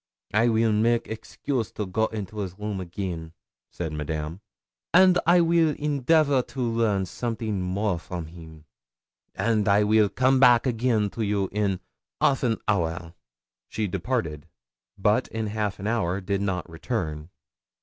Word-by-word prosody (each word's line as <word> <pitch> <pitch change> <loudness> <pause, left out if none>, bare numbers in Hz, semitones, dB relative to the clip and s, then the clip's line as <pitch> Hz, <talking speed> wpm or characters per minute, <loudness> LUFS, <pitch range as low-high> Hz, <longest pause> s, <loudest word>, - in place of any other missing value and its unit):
'I 115 +3 +4
weel 110 0 +2
make 115 +2 +2
excuse 115 +2 -4
to 105 - -3
go 110 +4 0
into 105 -1 -6
his 95 -2 -4
room 105 -2 -4
again,' 85 -2 -5 0.4
said 80 -3 -5
Madame; 75 +4 -4 0.5
'and 185 -1 +7
I 175 +1 +6
weel 165 -2 +3
endeavor 145 -1 +2
to 130 - -10
learn 115 -5 +1
something 110 0 -3
more 95 0 -1
from 85 -1 -6
him, 80 -1 -13 0.7
and 110 +1 +1
I 100 +1 +4
weel 105 0 +4
come 130 +5 +2
back 125 -2 +6
again 115 -4 +1
to 115 - -5
you 100 -2 0
in 100 -3 -1 0.4
half 135 - +3
an 115 -4 +1
hour.' 85 -4 -1 0.6
She 110 -1 -2
departed. 90 - -3 0.5
But - - +2
in 110 0 -3
half 105 -1 -2
an 100 - -7
hour 105 -5 0
did 100 +1 -2
not 95 -3 -2
return. 80 -3 -4
105 Hz, 150 wpm, -25 LUFS, 90-115 Hz, 0.7 s, and